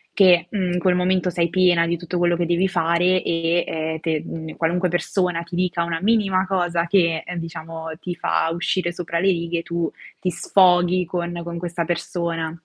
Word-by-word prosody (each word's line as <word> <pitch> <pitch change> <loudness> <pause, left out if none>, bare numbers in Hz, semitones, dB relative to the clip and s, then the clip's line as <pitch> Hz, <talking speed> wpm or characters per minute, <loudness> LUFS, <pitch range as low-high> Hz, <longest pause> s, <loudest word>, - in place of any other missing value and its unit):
che, 180 -3 +5
mhmm, 185 -4 -1
in 180 - 0
quel 180 0 +2
momento 180 0 +1
sei 170 -1 0
piena 180 -2 +3
di 170 +1 -1
tutto 175 +1 -5
quello 175 0 +2
che 175 - 0
devi 175 +3 +2
fare 175 +1 +2
e 165 +1 0
e 160 0 -3
te 160 -2 -1
mhmm, 160 -1 -7
qualunque 175 +3 0
persona 175 -1 -1
ti 170 +1 -8
dica 180 -1 0
una 170 -1 -2
minima 195 -3 +2
cosa 175 -3 0
che, 170 -3 +2
ehm, 180 - -6
diciamo, 165 -1 -7
ti 180 -1 -5
fa 170 -1 0
uscire 175 0 -1
sopra 170 -1 -3
le 190 - +1
righe, 170 -1 -2
tu 170 -1 -2 0.3
ti 185 - -1
sfoghi 180 0 +3
con 175 0 -4
con 170 0 -6
questa 170 0 -3
persona. 170 -1 -2
175 Hz, 190 wpm, -22 LUFS, 170-180 Hz, 0.3 s, che